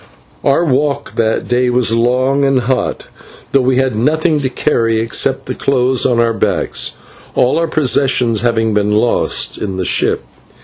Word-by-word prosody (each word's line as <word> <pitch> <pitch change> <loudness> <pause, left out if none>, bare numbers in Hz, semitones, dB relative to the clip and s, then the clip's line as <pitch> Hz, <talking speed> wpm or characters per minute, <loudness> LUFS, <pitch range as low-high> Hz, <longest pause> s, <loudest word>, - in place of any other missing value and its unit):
Our 140 +5 +2
walk 140 0 -1
that 110 -1 -1
day 125 +1 +1
was 125 -2 +1
long 130 +4 +1
and 135 -2 +2
hot, 125 +1 -2 0.5
though 135 - +3
we 130 0 +1
had 130 -2 0
nothing 155 +6 +1
to 135 -2 -2
carry 115 -4 0
except 115 0 -1
the - - -4
clothes 130 -2 +1
on 120 -1 +1
our 115 -1 +2
backs, - - -1 0.4
all 125 +6 +2
our 165 - 0
possessions, 130 -6 +1
having 115 -2 0
been 105 0 +1
lost 105 - 0
in 95 -3 -4
the 95 - -2
ship. - - +1
125 Hz, 165 wpm, -14 LUFS, 115-135 Hz, 0.5 s, though